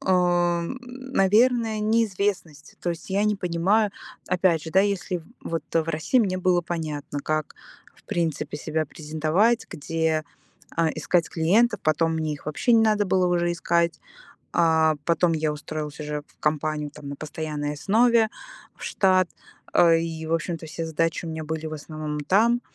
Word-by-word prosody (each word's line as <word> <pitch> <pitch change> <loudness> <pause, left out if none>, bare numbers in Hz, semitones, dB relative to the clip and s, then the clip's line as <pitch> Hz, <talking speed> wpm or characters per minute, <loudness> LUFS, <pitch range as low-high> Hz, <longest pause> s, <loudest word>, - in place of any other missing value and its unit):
наверное, 215 +6 +1
неизвестность. 205 -7 -1
То 175 - 0
есть 170 +3 -7
я 200 +2 +2
не 210 -1 +2
понимаю, 195 +4 +1 0.4
опять 180 -3 +2
же, 160 - -7
да, 190 - +5
если 195 -3 -1 0.2
вот 165 0 -3
в 165 -1 +2
России 165 - +1
мне 190 -5 +1
было 180 -1 +3
понятно, 150 -4 -4
как 155 +1 -2 0.4
в - - -25
принципе 165 -3 -2
себя 155 0 -2
презентовать, 160 +10 +1
где, 160 +1 -1 0.5
а, 165 -1 +3
искать 175 -2 +1
клиентов, 205 +8 +2
потом 160 +1 +2
мне 155 -1 -1
их 145 - -14
вообще 195 - +1
не 225 - +6
надо 215 -2 +3
было 185 0 +2
уже 175 -1 +1
искать. 170 0 0 0.5
А 160 -2 +4
потом 170 0 +3
я 155 -1 0
устроилась 150 0 -6
уже 150 -1 -4
в - - -29
компанию 150 -1 -1
там 145 -1 -10
на 140 - -5
постоянной 150 -1 -4
основе, 225 +7 +3 0.5
в - - -15
штат, 185 -2 +3 0.4
а, 170 -1 +6
и, 165 -1 -2
в 165 - 0
общем-то, 165 0 -3
все 165 +2 -5
задачи 165 +2 -1
у - - -4
меня 160 0 -4
были 160 +1 -4
в 155 - -6
основном 155 0 -5
там. 225 +10 +3
170 Hz, 160 wpm, -25 LUFS, 155-195 Hz, 0.5 s, не